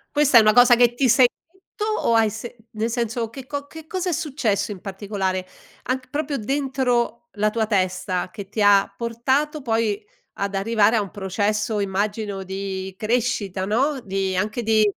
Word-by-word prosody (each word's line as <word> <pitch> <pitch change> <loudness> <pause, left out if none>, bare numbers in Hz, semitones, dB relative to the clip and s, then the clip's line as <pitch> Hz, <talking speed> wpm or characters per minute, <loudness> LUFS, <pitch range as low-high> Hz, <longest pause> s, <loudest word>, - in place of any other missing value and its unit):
Questa 290 -4 +5
è - - +10
una 215 0 +5
cosa 245 0 +7
che 240 0 +4
ti 260 0 +2
sei 245 +2 +6 0.2
detto 380 +3 -7
o 430 - +1
hai 225 -1 +4
se 230 +3 -7 0.2
nel 225 0 -2
senso, 235 -1 -2
che 260 +2 -9
co 285 0 -5
che 320 0 -11
cosa 370 -1 -2
è - - 0
successo 235 -10 -1
in 190 -3 -8
particolare? 195 -2 -3 0.4
Anc 260 +1 -3
proprio, 290 0 -2
dentro 245 -2 -1
la 210 0 +1
tua 220 -1 0
testa 185 -2 -1
che 200 -2 -8
ti 215 - -3
ha 200 -1 +5
portato 265 +6 -1
poi 225 -3 0 0.4
ad 200 0 -2
arrivare 215 +2 +3
a 220 - +3
un 200 - -5
processo, 210 +2 -1
immagino, 200 0 -2
di 190 0 -5
crescita, 215 -5 -1
no, 265 +7 +1
di 190 -1 -2
anche 215 +5 -1
di 220 -1 +4
225 Hz, 175 wpm, -23 LUFS, 200-255 Hz, 0.4 s, è